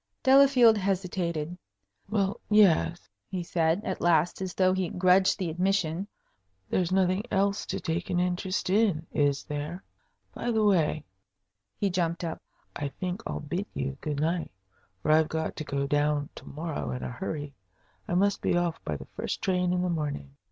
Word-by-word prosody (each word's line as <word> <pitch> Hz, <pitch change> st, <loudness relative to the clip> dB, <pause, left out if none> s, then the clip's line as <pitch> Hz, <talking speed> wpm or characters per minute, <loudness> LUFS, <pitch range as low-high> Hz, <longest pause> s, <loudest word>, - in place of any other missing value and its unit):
Delafield 260 Hz, -5 st, +6 dB
hesitated. 180 Hz, -4 st, -1 dB, 0.5 s
"Well, 200 Hz, -2 st, 0 dB
yes," 190 Hz, -5 st, +4 dB, 0.2 s
he 185 Hz, -2 st, -3 dB
said, 170 Hz, +3 st, +1 dB
at 185 Hz, -, -3 dB
last, 170 Hz, +1 st, +2 dB
as 185 Hz, -2 st, -4 dB
though 185 Hz, -1 st, +3 dB
he 185 Hz, -2 st, -1 dB
grudged 185 Hz, +1 st, +4 dB
the 175 Hz, -4 st, -2 dB
admission. 185 Hz, 0 st, 0 dB, 0.6 s
"There's 180 Hz, -1 st, +1 dB
nothing 185 Hz, 0 st, +2 dB
else 200 Hz, +1 st, +1 dB
to -, -, -2 dB
take 165 Hz, +2 st, -3 dB
an 175 Hz, -, +1 dB
interest 180 Hz, +1 st, -1 dB
in, 195 Hz, -6 st, +2 dB
is 145 Hz, -2 st, +1 dB
there? 150 Hz, +5 st, -5 dB, 0.5 s
By 240 Hz, -, -3 dB
the 220 Hz, -2 st, +2 dB
way" 165 Hz, -7 st, +2 dB, 0.7 s
he 200 Hz, -2 st, 0 dB
jumped 170 Hz, -1 st, -1 dB
up 165 Hz, -1 st, -4 dB, 0.3 s
"I 145 Hz, -, -2 dB
think 180 Hz, +7 st, -4 dB
I'll -, -, -4 dB
bid 175 Hz, +7 st, -3 dB
you 135 Hz, 0 st, -2 dB
good 150 Hz, -2 st, -3 dB
night, 165 Hz, +2 st, 0 dB, 0.5 s
for -, -, +2 dB
I've 155 Hz, 0 st, +4 dB
got 160 Hz, 0 st, -2 dB
to -, -, -3 dB
go 140 Hz, -1 st, -2 dB
down 145 Hz, 0 st, +1 dB
to -, -, -12 dB
morrow 160 Hz, +1 st, -4 dB
in 125 Hz, -, -4 dB
a -, -, -4 dB
hurry. 145 Hz, +1 st, -5 dB, 0.5 s
I 175 Hz, -, -1 dB
must 200 Hz, +2 st, +2 dB
be -, -, +2 dB
off 175 Hz, -2 st, -1 dB
by 75 Hz, -, -3 dB
the -, -, -10 dB
first -, -, -4 dB
train 180 Hz, -1 st, +1 dB
in 180 Hz, 0 st, +1 dB
the -, -, +1 dB
morning." 145 Hz, -, -3 dB
175 Hz, 175 wpm, -28 LUFS, 155-190 Hz, 0.7 s, Delafield